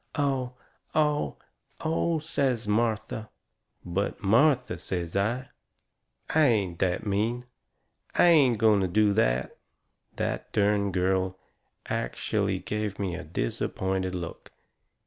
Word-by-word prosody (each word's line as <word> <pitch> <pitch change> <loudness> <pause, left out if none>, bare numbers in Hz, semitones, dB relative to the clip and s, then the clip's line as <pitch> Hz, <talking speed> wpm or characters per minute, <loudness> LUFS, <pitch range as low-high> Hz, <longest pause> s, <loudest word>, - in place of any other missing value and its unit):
"Oh! 135 -4 0 0.4
Oh! 150 - +1 0.4
Oh! 165 +1 0
" 155 - -14
says 130 -8 0
Martha. 110 0 0 0.6
"But, 95 +4 -2
Martha," 125 +5 +3
says 85 -2 -4
I, 120 +7 0 0.8
"I 155 - +4
ain't 100 -8 +1
that 90 +2 0
mean. 110 +5 0 0.7
I - - +5
ain't 145 -9 +6
going 105 -2 +4
to 95 - +1
do 105 +3 +3
that." - - +1 0.6
That - - -3
dern 100 -1 +2
girl 95 0 0 0.5
ackshellay - - -1
give 105 -2 -2
me 95 -3 -2
a - - -5
disappointed 95 +8 -2
look! 85 -2 -6
105 Hz, 115 wpm, -27 LUFS, 95-125 Hz, 0.8 s, ain't